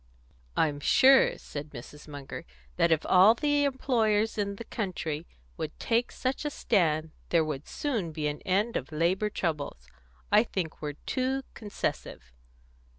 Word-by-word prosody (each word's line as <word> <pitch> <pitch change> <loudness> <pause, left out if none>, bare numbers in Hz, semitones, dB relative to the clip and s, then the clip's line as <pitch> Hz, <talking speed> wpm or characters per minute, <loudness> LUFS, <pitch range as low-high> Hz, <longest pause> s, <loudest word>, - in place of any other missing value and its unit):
"I'm 145 -2 +2
sure," 265 - +5
said 145 +1 -7
Mrs. 150 +4 -11
Munger, 145 -2 -7 0.3
"that 170 - +3
if 160 -1 +2
all 190 +5 +7
the 290 +2 +2
employers 225 -5 +1
in 200 -1 -2
the 230 - -7
country 170 -8 -4 0.3
would - - -5
take 235 +2 +1
such 260 +3 -2
a 295 - -1
stand, 160 - +1 0.2
there 165 -2 +3
would 150 -2 -5
soon 225 - -2
be 155 -1 -4
an 150 0 -2
end 205 +5 +1
of 135 - -6
labour 175 +7 +1
troubles. 145 - -3 0.4
I 210 +2 +6
think 180 -8 -4
we're 150 -1 -3
too 265 +1 -1
concessive." 65 - -5
185 Hz, 150 wpm, -29 LUFS, 150-230 Hz, 0.4 s, all